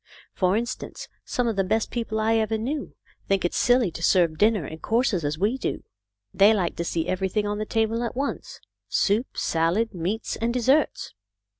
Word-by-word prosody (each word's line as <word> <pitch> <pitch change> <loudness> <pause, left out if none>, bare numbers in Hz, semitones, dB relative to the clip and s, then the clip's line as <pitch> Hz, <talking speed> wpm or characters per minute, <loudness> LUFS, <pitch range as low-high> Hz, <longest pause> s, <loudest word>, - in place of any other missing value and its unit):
For 185 +2 +2
instance, 235 +1 -5 0.2
some 245 -1 -1
of 225 - 0
the 195 - +3
best 215 +3 0
peo 235 -2 -2
ple 220 0 -3
I 220 +1 +2
ever 220 0 0
knew 275 +7 -4 0.3
think 195 -2 +1
it 175 - +1
is - - -4
silly 245 -6 +3
to 165 - -8
serve 165 -3 +3
dinner 210 -6 +3
in 160 +3 -8
courses, 225 - +1
as 145 +1 -1
we 215 +9 0
do. - - -3 0.5
They 200 +3 +6
like 185 -4 -1
to 170 - -1
see 165 -1 -2
everything 190 +3 -1
on 205 0 -2
the 215 - -3
table 225 +1 0
at 235 - -4
once, 275 +2 -4 0.3
soup, 215 +6 0
salad, 175 +8 +1
meats, 185 +5 -3
and 230 +1 0
desserts." 260 +5 +1
215 Hz, 195 wpm, -25 LUFS, 185-230 Hz, 0.5 s, They